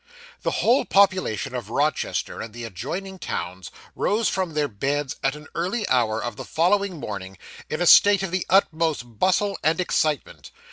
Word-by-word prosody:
The - - -1
whole 245 +4 +4
population 190 - +2
of - - -5
Rochester - - -1
and 110 0 -8
the 120 - -7
adjoining 190 - -6
towns 90 - -5 0.3
rose 215 +2 +1
from 185 -5 -2
their 150 -1 +1
beds 140 +5 -2
at 135 +1 +1
an 150 0 -11
early 195 +6 -2
hour 115 -3 +1
of 120 -3 -5
the - - -6
following 185 +1 +1
morning, 95 -5 -6 0.3
in 155 - -1
a - - +1
state 200 +2 +7
of 190 - -3
the 185 0 0
utmost 160 - +1
bustle 195 +2 +1
and 160 +3 +1
excitement. 155 -5 -1
155 Hz, 170 wpm, -24 LUFS, 120-190 Hz, 0.3 s, state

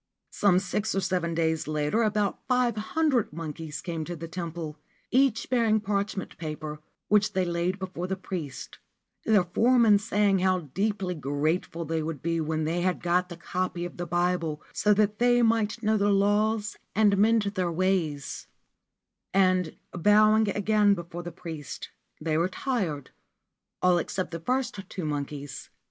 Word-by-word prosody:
Some 200 -3 +3
six 200 +3 -1
or - - +2
seven 180 -3 -1
days 160 -1 0
later 155 +7 0
about 210 -2 +1
five 250 -3 +2
hundred 245 +3 +1
monkeys 155 -1 -6
came 165 -3 -4
to 175 - -5
the 165 +1 -7
temple, 165 -3 -5 0.3
each 255 -3 +3
bearing 230 -4 +3
parchment 200 -1 -3
paper, 155 -1 -5 0.3
which 210 0 +3
they 185 -2 +1
laid 175 +2 -1
before 185 -2 -5
the 190 - -1
priest, 175 -8 -6 0.5
their 210 -4 +4
foreman 225 +3 +4
saying 205 -2 +2
how 185 0 +2
deeply 195 -2 -1
grateful 155 +3 -1
they 160 +1 -1
would 155 -3 -5
be 165 0 0
when 155 0 -1
they 165 +3 0
had 180 0 0
got 180 +1 +1
the 175 - -8
copy 175 0 -3
of 175 - -8
the 175 0 -4
Bible, 175 -3 0
so 210 - +2
that 210 0 +2
they 245 0 +4
might 225 0 +1
know 215 0 +3
the 205 0 +2
laws 205 +2 +2 0.2
and 210 -2 +4
mend 225 +1 +4
their 190 -4 -1
ways; 165 -5 -1 0.9
and, 185 -3 +2
bowing 215 +4 +4
again 205 0 +3
before 170 -1 -7
the 175 0 -7
priest, 160 -4 -7 0.3
they 155 0 0
retired, 180 - -2 0.7
all 180 -1 +5
except 185 +2 -3
the 165 - -4
first 250 +3 -1
two 180 -4 -5
monkeys. 145 -1 -5
185 Hz, 155 wpm, -27 LUFS, 165-210 Hz, 0.9 s, all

